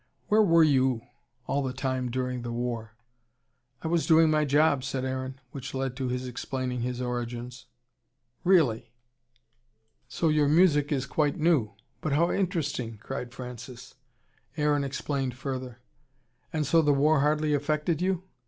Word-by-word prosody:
"Where 215 +1 +5
were 165 -5 +5
YOU 130 -5 +2 0.4
all 140 - 0
the 130 -2 -2
time 130 -1 -2
during 125 0 -2
the 120 0 -5
war?" 115 -2 -4 0.9
"I - - -2
was 165 0 +1
doing 160 -1 +6
my 155 -1 +2
job," 145 -1 +3
said 135 -1 -3
Aaron. 130 0 -4
Which 130 -1 -7
led 130 -1 -2
to 130 -2 -2
his 125 +1 -2
explaining 125 0 -3
his 125 +1 -3
origins. 120 0 -5 0.8
"Really! 135 -11 +3 1.1
So 145 +7 0
your 150 -1 +3
music 150 -2 +4
is 140 -2 0
quite 145 +1 0
new! 150 -11 +2 0.3
But 155 - -1
how 170 +4 +3
interesting!" 150 - -2
cried 125 +3 -6
Francis. 125 0 -9 0.6
Aaron 150 -1 +2
explained 135 -2 -2
further. 130 -2 -5 0.7
"And 155 -2 -1
so 165 +4 +4
the 145 -2 +3
war 150 +2 +3
hardly 150 +1 +2
affected 150 +3 0
you? 185 -1 0
135 Hz, 145 wpm, -28 LUFS, 125-155 Hz, 1.1 s, doing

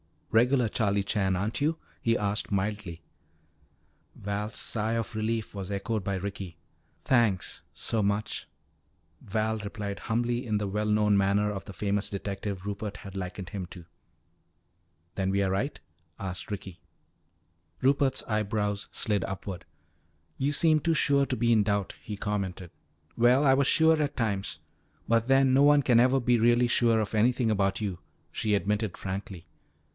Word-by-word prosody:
"Regular 125 +2 +4
Charlie 100 -3 +1
Chan, 95 -1 +1
aren't 100 +5 -2
you?" 155 +3 +1 0.2
he 115 0 +2
asked 105 +1 -1
mildly. 100 -4 -2 1.1
Val's 105 +2 -4
sigh 110 0 -1
of 115 -1 -2
relief 110 0 -2
was 100 -2 -6
echoed 100 +1 -2
by 100 - -1
Ricky. 95 -2 -5 0.5
"Thanks 115 -8 +1
so 110 - -1
much," 100 +1 -1 0.7
Val 110 +2 -1
replied 100 -1 -5
humbly 120 +2 -1
in 105 -1 +1
the 105 -1 -2
well 105 +2 -1
known 105 -1 +3
manner 100 +1 +2
of 100 -2 -6
the 100 - -9
famous 100 +3 -1
detective 100 -1 -4
Rupert 105 0 -4
had 100 -1 -10
likened 90 0 -5
him 100 -3 -5
to. 85 -1 -11 1.3
"Then 95 -1 0
we 100 +1 +2
are 95 - 0
right?" 100 +10 -1 0.4
asked 95 -2 -5
Ricky. 95 -4 -6 1.0
Rupert's 135 0 +2
eyebrows 105 -1 -1
slid 105 -6 0
upward. 95 -2 -6 0.7
"You 140 +2 0
seemed 155 0 +3
too 165 -1 +3
sure 140 -2 +3
to 130 - -1
be 120 -1 +2
in 110 -2 +5
doubt," 100 -1 0
he 105 -2 -6
commented. 95 -4 -3 0.5
"Well, 125 +4 +5
I 135 -2 +5
was 140 0 +3
sure 160 -1 +4
at 145 0 -2
times. 100 -5 -2 0.5
But 115 0 +3
then 135 -1 +4
no 135 - +5
one 145 0 +6
can 120 -3 +5
ever 130 +2 +4
be 120 0 +3
really 120 +1 +4
sure 115 -2 +3
of 105 - -4
anything 115 +1 +2
about 100 -1 +1
you," 95 -5 -3 0.3
she 105 -1 0
admitted 105 0 -1
frankly. 95 -2 -6
105 Hz, 155 wpm, -28 LUFS, 100-120 Hz, 1.3 s, one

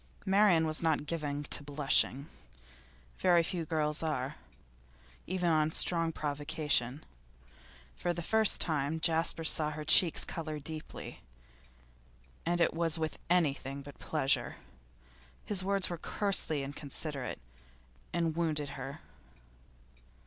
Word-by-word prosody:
'Marian 190 -4 +4
was 155 0 -1
not 160 -3 +1
given 150 -3 -3
to 145 - 0
blushing; 140 -1 +2 0.9
very 175 -2 +4
few 170 0 -3
girls 150 -2 -1
are, 150 -3 -2 0.9
even 180 -1 -1
on 155 0 +2
strong 165 0 +2
provocation. 145 -3 -1 0.9
For 175 - -2
the 170 0 -4
first 220 +4 +3
time 155 -1 -1
Jasper 165 0 +1
saw 155 -1 +3
her 155 0 -6
cheeks 165 +2 +6
colour 155 -2 -5
deeply, 155 +1 -7 1.3
and 175 0 +1
it 170 - +3
was 165 0 +1
with 160 -1 -3
anything 140 -5 0
but 145 0 -12
pleasure. 140 -4 +1 0.9
His 195 -3 0
words 195 0 +5
were 175 -2 -5
coarsely 190 -9 -1
inconsiderate, 140 -1 -4 0.7
and 165 -2 -1
wounded 155 -4 -1
her. 140 +2 -7
155 Hz, 115 wpm, -32 LUFS, 145-170 Hz, 1.3 s, cheeks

